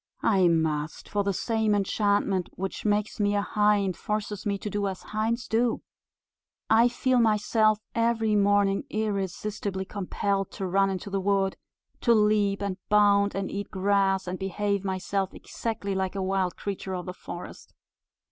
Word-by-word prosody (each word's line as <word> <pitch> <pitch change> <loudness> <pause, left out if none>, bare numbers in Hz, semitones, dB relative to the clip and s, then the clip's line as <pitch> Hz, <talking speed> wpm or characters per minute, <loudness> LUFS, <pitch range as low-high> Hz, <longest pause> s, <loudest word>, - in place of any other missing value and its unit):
"I 190 -4 +4
must; 160 -2 0
for 205 -1 0
the 200 - +1
same 220 +1 +1
enchantment 200 -2 +1
which 195 +3 -5
makes 210 +1 0
me 205 0 +2
a 205 - +1
hind 205 -3 +2
forces 210 0 -3
me 200 -1 0
to 205 - -7
do 205 0 -1
as 190 -1 -5
hinds 225 +3 -2
do. 230 +1 +1 0.9
I 230 +2 +6
feel 250 +1 +1
myself 215 -1 +3 0.2
every 230 -2 +1
morning 200 -1 +3
irresistibly 200 -1 -2
compelled 200 0 -2
to 195 - -4
run 195 +2 +2
into 195 +1 -4
the 195 0 0
wood, 195 0 +1 0.4
to 235 -2 +4
leap 210 -2 +2
and 195 -2 -2
bound, 205 -1 +4
and 195 -1 -2
eat 200 0 -4
grass, 195 -1 +1
and 180 0 -4
behave 200 +1 -1
myself 190 0 -2
exactly 210 -3 -4
like 190 0 -2
a 195 - -1
wild 190 -1 0
creature 195 -1 -4
of 180 - -5
the 180 - -5
forest. - - -9
200 Hz, 155 wpm, -27 LUFS, 190-210 Hz, 0.9 s, I